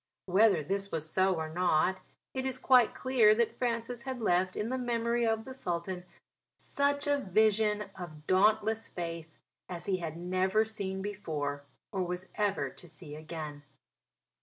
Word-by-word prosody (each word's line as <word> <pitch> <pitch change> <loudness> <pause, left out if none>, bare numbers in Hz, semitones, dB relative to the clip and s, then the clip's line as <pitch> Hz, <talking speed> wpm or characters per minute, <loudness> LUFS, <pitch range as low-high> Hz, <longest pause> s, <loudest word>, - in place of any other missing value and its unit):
Whether 190 -3 +4
this 195 +4 -2
was 160 -1 -2
so 185 +3 +2
or 160 -1 -3
not, 180 +2 +2 0.3
it 260 - -2
is 260 -1 -1
quite 255 -3 +5
clear 240 -5 +4
that 235 0 0
Francis 235 0 -1
had 260 -1 -4
left 185 -4 +2
in 215 - -2
the 260 - -1
memory 235 -1 +1
of 225 0 0
the 260 - -7
Sultan 180 -5 -3 0.5
such 285 0 0
a 285 -1 +2
vision 210 -1 +2
of 155 -5 -9
dauntless 215 +3 +3
faith 165 -2 -6 0.3
as 175 -1 -6
he 195 -2 +1
had 165 -2 -5
never 185 +4 +1
seen 190 -3 -4
before 150 -8 -3 0.3
or 190 - -1
was 180 +1 -3
ever 195 -10 0
to 175 - -12
see 160 -3 -9
again. 155 -2 -6
195 Hz, 160 wpm, -31 LUFS, 175-225 Hz, 0.5 s, quite